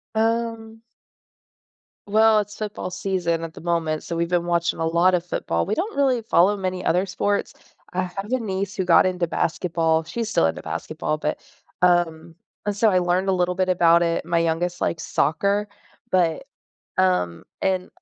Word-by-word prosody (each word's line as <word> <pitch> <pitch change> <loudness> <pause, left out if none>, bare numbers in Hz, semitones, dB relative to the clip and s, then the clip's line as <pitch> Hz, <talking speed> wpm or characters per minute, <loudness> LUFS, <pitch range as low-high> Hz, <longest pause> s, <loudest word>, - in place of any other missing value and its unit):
Um 225 0 -1 1.3
Well, 220 +1 +5
it's 210 0 -4
football 210 -3 -4
season 180 -3 -1
at 165 -1 -6
the - - -11
moment, 165 -2 -1
so 170 - -5
we've 170 0 -1
been 175 -1 +1
watching 170 -1 0
a 165 - 0
lot 170 +3 +3
of 175 -1 0
football. 85 - -1
We - - -1
don't 405 +6 -3
really 260 -4 +2
follow 205 -2 +3
many 185 -2 -3
other 180 +3 +2
sports. 200 +2 -1 0.4
I 185 +1 0
have 195 +4 -6
a 255 - +2
niece 195 -3 -3
who 190 - 0
got 175 - +6
into 180 -2 0
basketball. 165 -1 0
She's 225 +6 -4
still 80 - +2
into 80 - -1
basketball, 155 - -3
but 150 0 -2 0.4
um, 170 -2 +2 0.3
and 205 -1 -1
so 220 +2 +4
I 185 -2 +3
learned 180 +2 0
a 190 - +3
little 180 0 0
bit 185 0 0
about 170 -2 +4
it. 170 0 0
My 170 0 +1
youngest 170 +2 -1
likes 160 -2 -1
soccer, 200 +6 +1 0.4
but 170 -4 +1 0.5
um, 90 -2 +1 0.2
and 185 -1 0
180 Hz, 175 wpm, -23 LUFS, 165-200 Hz, 1.3 s, got